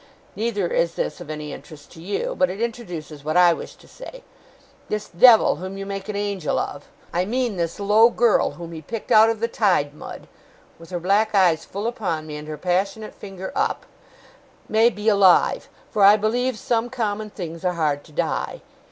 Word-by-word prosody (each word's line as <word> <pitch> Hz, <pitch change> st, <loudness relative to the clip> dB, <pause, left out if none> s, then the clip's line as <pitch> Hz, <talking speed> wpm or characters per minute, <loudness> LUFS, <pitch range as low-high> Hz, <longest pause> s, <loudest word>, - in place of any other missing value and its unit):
Neither 210 Hz, -3 st, -1 dB
is 170 Hz, 0 st, 0 dB
this -, -, -3 dB
of 165 Hz, -, -10 dB
any 150 Hz, -1 st, -6 dB
interest 150 Hz, -3 st, -12 dB
to 160 Hz, -, -13 dB
you; 205 Hz, -, -3 dB
but 275 Hz, -, +2 dB
it 195 Hz, -, -6 dB
introduces 175 Hz, -11 st, -5 dB
what 155 Hz, +3 st, 0 dB
I 175 Hz, -1 st, +6 dB
wish -, -, -8 dB
to -, -, -20 dB
say. -, -, -11 dB, 0.7 s
This 210 Hz, 0 st, -3 dB
devil 220 Hz, 0 st, +6 dB
whom 190 Hz, +3 st, -7 dB
you 195 Hz, -, -5 dB
make 195 Hz, +1 st, -6 dB
an 210 Hz, -, -3 dB
angel 200 Hz, -6 st, -2 dB
of. -, -, -4 dB, 0.3 s
I 175 Hz, -, +1 dB
mean 240 Hz, 0 st, -1 dB
this 170 Hz, 0 st, -3 dB
low 210 Hz, +3 st, +5 dB
girl 235 Hz, -1 st, +2 dB
whom 170 Hz, -1 st, -9 dB
he 160 Hz, -1 st, -8 dB
picked 220 Hz, +8 st, -7 dB
out 220 Hz, +1 st, +7 dB
of 225 Hz, -1 st, -2 dB
the 230 Hz, -, 0 dB
tide 185 Hz, -11 st, +1 dB
mud,' 150 Hz, -, -10 dB, 0.5 s
with 165 Hz, -, -13 dB
her 180 Hz, -1 st, -3 dB
black 200 Hz, +5 st, +1 dB
eyes 170 Hz, -4 st, +3 dB
full 200 Hz, +3 st, -6 dB
upon 195 Hz, -10 st, -2 dB
me, 150 Hz, -1 st, -7 dB
and 150 Hz, 0 st, -8 dB
her 155 Hz, -1 st, -6 dB
passionate 195 Hz, +6 st, -2 dB
finger 190 Hz, -2 st, -8 dB
up, -, -, -1 dB, 0.8 s
'may 225 Hz, +2 st, +4 dB
be 210 Hz, -2 st, -6 dB
alive, 200 Hz, -4 st, +4 dB, 0.2 s
for 205 Hz, -, +2 dB
I 205 Hz, +2 st, +8 dB
believe 240 Hz, +3 st, 0 dB
some 235 Hz, +2 st, -1 dB
common 215 Hz, -4 st, -3 dB
things 170 Hz, -4 st, -7 dB
are 180 Hz, -1 st, +1 dB
hard 150 Hz, -4 st, -1 dB
to 155 Hz, -, -17 dB
die. -, -, -3 dB
195 Hz, 195 wpm, -22 LUFS, 170-220 Hz, 0.8 s, I